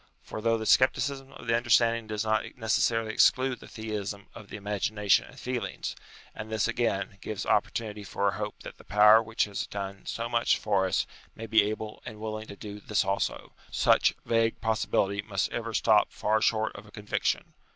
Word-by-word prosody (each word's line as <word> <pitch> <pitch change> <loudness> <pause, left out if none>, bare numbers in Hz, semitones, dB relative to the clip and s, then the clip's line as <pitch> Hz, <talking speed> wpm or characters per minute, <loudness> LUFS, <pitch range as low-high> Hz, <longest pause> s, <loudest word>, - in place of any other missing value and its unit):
For, 110 - -7
though 115 +1 +2
the 110 - -5
scepti 130 +4 +5
cism 135 -1 -3
of - - -10
the 115 0 +2
understanding 115 -1 +3
does 110 0 -2
not 110 0 +2
necessarily 115 -1 +1
exclude 130 +1 +3
the - - -12
Theism 105 -2 -5
of 100 - -12
the - - -6
imagination 105 0 +1
and - - -14
feelings, - - -4 0.4
and 110 +1 -7
this, 110 -2 +1
again, 100 -4 -1
gives 105 -3 -4
opportunity 105 -2 0
for 100 0 -1
a - - +3
hope 105 0 -5
that - - -10
the - - -14
power 105 +1 +6
which 115 0 0
has 100 -1 -3
done 100 -1 -6
so 115 0 -3
much 120 0 +2
for 100 -3 +1
us - - +1 0.3
may 115 - -7
be 110 0 +5
able 110 0 -6
and 110 - -9
willing 110 0 -5
to 100 - -9
do 105 0 -8
this 105 +1 0
also, 100 +1 -2 0.2
such - - +3
vague 115 -1 +1
possibility 100 -2 0
must 100 -2 -2
ever 115 -1 -3
stop 110 -1 +3
far 110 +1 0
short 110 -1 +1
of 100 +1 -10
a - - -16
conviction. 105 -1 -2
110 Hz, 195 wpm, -28 LUFS, 105-115 Hz, 0.4 s, power